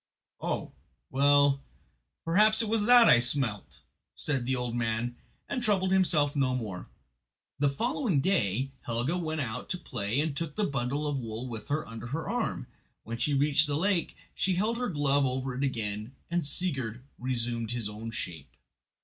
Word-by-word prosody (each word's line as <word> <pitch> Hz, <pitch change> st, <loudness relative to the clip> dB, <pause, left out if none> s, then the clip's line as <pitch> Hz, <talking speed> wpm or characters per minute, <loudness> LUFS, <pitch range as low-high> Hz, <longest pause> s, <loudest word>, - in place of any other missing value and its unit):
"Oh, -, -, -2 dB, 0.4 s
well, 140 Hz, 0 st, +4 dB, 0.6 s
perhaps 215 Hz, +7 st, +4 dB
it -, -, -2 dB
was 215 Hz, -1 st, +1 dB
that 245 Hz, -1 st, +8 dB
I 120 Hz, -, +8 dB
smelt," 120 Hz, -4 st, 0 dB, 0.3 s
said 130 Hz, -, -2 dB
the 130 Hz, -, +2 dB
old 125 Hz, -1 st, -2 dB
man, 120 Hz, 0 st, -1 dB, 0.3 s
and 250 Hz, -, -2 dB
troubled 195 Hz, -5 st, +2 dB
himself 155 Hz, -6 st, +3 dB
no 130 Hz, -3 st, +2 dB
more. 105 Hz, -7 st, -5 dB, 0.7 s
The 145 Hz, 0 st, +3 dB
following 230 Hz, -, 0 dB
day 135 Hz, -, +1 dB, 0.2 s
Helga 120 Hz, +8 st, 0 dB
went 160 Hz, -3 st, -2 dB
out 120 Hz, -1 st, -4 dB
to 180 Hz, -, -1 dB
play 120 Hz, -, -2 dB
and 150 Hz, -1 st, 0 dB
took 155 Hz, 0 st, -4 dB
the 215 Hz, -, 0 dB
bundle 140 Hz, -2 st, -1 dB
of 145 Hz, -2 st, -1 dB
wool 115 Hz, +1 st, -5 dB
with 115 Hz, -3 st, -7 dB
her 150 Hz, +2 st, -1 dB
under 115 Hz, +1 st, -7 dB
her 155 Hz, +6 st, -3 dB
arm. 235 Hz, -, -1 dB, 0.4 s
When 115 Hz, +1 st, -5 dB
she 145 Hz, +4 st, +1 dB
reached 145 Hz, +2 st, +4 dB
the 145 Hz, -1 st, 0 dB
lake 185 Hz, 0 st, +1 dB, 0.2 s
she 185 Hz, -1 st, +1 dB
held 220 Hz, +6 st, 0 dB
her 245 Hz, -, -1 dB
glove 145 Hz, -3 st, +2 dB
over 130 Hz, 0 st, -2 dB
it 130 Hz, +3 st, -2 dB
again 110 Hz, -2 st, -2 dB, 0.2 s
and 175 Hz, 0 st, +1 dB
Sigurd 135 Hz, -8 st, -2 dB, 0.2 s
resumed 120 Hz, -2 st, -2 dB
his 120 Hz, -3 st, -2 dB
own 105 Hz, +2 st, -6 dB
shape. 90 Hz, -7 st, -6 dB
140 Hz, 170 wpm, -29 LUFS, 120-165 Hz, 0.7 s, that